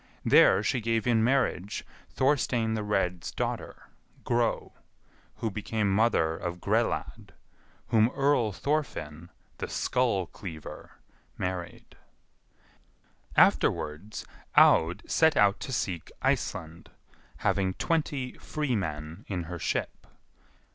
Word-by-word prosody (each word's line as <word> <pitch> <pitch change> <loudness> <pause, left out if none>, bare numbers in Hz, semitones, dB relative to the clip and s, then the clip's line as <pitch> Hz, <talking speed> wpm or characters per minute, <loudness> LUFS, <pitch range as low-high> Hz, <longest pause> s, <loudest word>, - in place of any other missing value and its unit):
There - - +6
she 125 - 0
gave 115 0 0
in 115 -3 +3
marriage 115 -6 0 0.2
Thorstein 125 -5 +1
the 110 - -1
Red's 95 -4 -1
daughter, - - -4 0.3
Gro, 120 -2 0 0.6
who 115 - -3
became 105 0 -1
mother 100 -7 +2
of 90 +1 -5
Grelad, - - -1 0.6
whom 110 0 +4
Earl 135 -6 +2
Thorfinn, 90 - -3 0.3
the - - -3
Skullcleaver, 95 - -2 0.5
married. 90 -2 -5 1.4
Afterwards 80 +8 +2 0.3
Aud 80 +2 +5
set 160 -1 +3
out 100 -1 +4
to - - -6
seek 95 - -3
Iceland, 80 +1 -2 0.6
having 95 -2 +1
twenty 145 -6 -1
free 150 -5 -2
men 80 -1 -4
in 90 -4 -3
her 85 +1 -6
ship. - - -3
105 Hz, 100 wpm, -28 LUFS, 90-120 Hz, 1.4 s, There